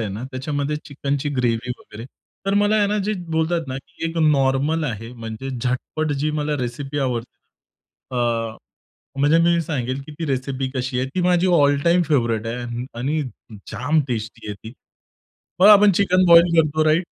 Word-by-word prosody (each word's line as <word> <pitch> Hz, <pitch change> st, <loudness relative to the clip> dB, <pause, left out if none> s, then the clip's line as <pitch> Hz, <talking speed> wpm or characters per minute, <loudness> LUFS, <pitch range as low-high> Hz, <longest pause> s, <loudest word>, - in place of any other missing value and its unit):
आहे 110 Hz, -, -2 dB
ना 105 Hz, +4 st, -6 dB
त्याच्यामध्ये 145 Hz, +2 st, -2 dB
चिकनची 140 Hz, 0 st, -3 dB
ग्रेव्ही 125 Hz, -1 st, 0 dB
वगैरे. 105 Hz, +2 st, -11 dB, 0.4 s
तर 195 Hz, -, +1 dB
मला 205 Hz, +1 st, +3 dB
आहे 205 Hz, -1 st, +3 dB
ना 210 Hz, +1 st, 0 dB
जे 215 Hz, -, +1 dB, 0.2 s
बोलतात 160 Hz, +1 st, 0 dB
ना 130 Hz, -, -4 dB, 0.3 s
एक 165 Hz, 0 st, -3 dB
नॉर्मल 145 Hz, +2 st, +2 dB
आहे. 115 Hz, -3 st, -5 dB
म्हणजे 115 Hz, +2 st, -7 dB
झटपट 130 Hz, +5 st, -2 dB
जी 155 Hz, -, +1 dB
मला 150 Hz, 0 st, -1 dB
रेसिपी 135 Hz, +4 st, -4 dB
आवडते. 125 Hz, -3 st, -3 dB, 0.8 s
अ, 115 Hz, -2 st, -1 dB, 0.6 s
म्हणजे 145 Hz, +4 st, +4 dB
मी 170 Hz, 0 st, +3 dB
सांगेल 130 Hz, -4 st, -3 dB
की 155 Hz, -, -9 dB
ती 165 Hz, -, -3 dB
रेसिपी 130 Hz, -1 st, -2 dB
कशी 130 Hz, 0 st, -2 dB
आहे 130 Hz, -, 0 dB
ती 185 Hz, -, 0 dB
माझी 180 Hz, 0 st, +3 dB
ऑल 145 Hz, -5 st, +4 dB
टाईम 175 Hz, +1 st, +4 dB
फेव्हरेइट 115 Hz, -6 st, +1 dB
आहे 120 Hz, +1 st, -4 dB
आणि 145 Hz, +5 st, -1 dB, 0.5 s
जाम 145 Hz, +5 st, +1 dB
टेस्टी 110 Hz, -3 st, -5 dB
आहे 105 Hz, -, -4 dB
ती. 110 Hz, +3 st, -11 dB, 0.9 s
मग 190 Hz, -, +7 dB
आपण 205 Hz, -1 st, +8 dB
चिकन 185 Hz, 0 st, +3 dB
बॉईल 170 Hz, 0 st, +7 dB
करतो 155 Hz, -1 st, +3 dB
राइट? 155 Hz, +3 st, +3 dB
140 Hz, 170 wpm, -21 LUFS, 125-165 Hz, 0.9 s, आपण